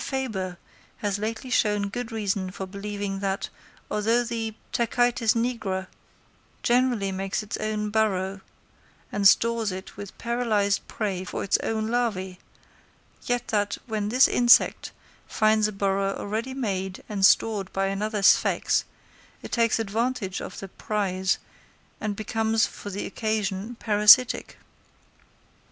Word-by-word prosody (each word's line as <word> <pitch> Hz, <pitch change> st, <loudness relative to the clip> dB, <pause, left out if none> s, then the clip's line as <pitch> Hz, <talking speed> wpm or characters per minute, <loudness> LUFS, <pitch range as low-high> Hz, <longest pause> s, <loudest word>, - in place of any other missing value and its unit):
Fabre 210 Hz, -10 st, -3 dB, 0.4 s
has 205 Hz, -1 st, -2 dB
lately 225 Hz, +4 st, -4 dB
shown 210 Hz, -4 st, +2 dB
good 245 Hz, +3 st, -5 dB
reason 200 Hz, -4 st, -1 dB
for 190 Hz, +1 st, -6 dB
believing 200 Hz, 0 st, -5 dB
that, 195 Hz, 0 st, -2 dB, 0.4 s
although 225 Hz, +3 st, +2 dB
the 225 Hz, -2 st, -4 dB, 0.2 s
Tachytes 240 Hz, -1 st, +2 dB
nigra 230 Hz, -6 st, -1 dB, 0.8 s
generally 240 Hz, -5 st, +2 dB
makes 195 Hz, +2 st, -2 dB
its 210 Hz, -, -5 dB
own 210 Hz, -1 st, -2 dB
burrow 195 Hz, -3 st, 0 dB, 0.7 s
and 200 Hz, -1 st, +4 dB
stores 230 Hz, 0 st, +3 dB
it 185 Hz, +1 st, -8 dB
with 200 Hz, -1 st, -9 dB
paralysed 225 Hz, -4 st, 0 dB
prey 195 Hz, -4 st, -3 dB
for -, -, -4 dB
its 195 Hz, -, +2 dB
own 220 Hz, -1 st, -1 dB
larvæ, 200 Hz, -6 st, -1 dB, 0.9 s
yet 245 Hz, 0 st, -1 dB
that, 205 Hz, -2 st, 0 dB
when 215 Hz, -3 st, -2 dB
this 255 Hz, +4 st, +6 dB
insect 240 Hz, 0 st, +4 dB, 0.4 s
finds 215 Hz, 0 st, +3 dB
a -, -, -4 dB
burrow 195 Hz, 0 st, 0 dB
already 225 Hz, +6 st, -4 dB
made 190 Hz, -7 st, -3 dB
and 200 Hz, -2 st, -3 dB
stored 200 Hz, -1 st, +3 dB
by 195 Hz, 0 st, 0 dB
another 205 Hz, +1 st, -2 dB
sphex, -, -, +4 dB, 0.6 s
it -, -, -8 dB
takes 230 Hz, -2 st, +2 dB
advantage 225 Hz, -2 st, -2 dB
of -, -, -7 dB
the 195 Hz, -, -7 dB
prize, 190 Hz, -2 st, -1 dB, 0.6 s
and 210 Hz, -2 st, -2 dB
becomes 220 Hz, +1 st, +1 dB
for 205 Hz, -, -8 dB
the 200 Hz, +1 st, -4 dB
occasion 215 Hz, 0 st, -2 dB
parasitic. 210 Hz, +3 st, +5 dB
210 Hz, 130 wpm, -25 LUFS, 195-230 Hz, 0.9 s, this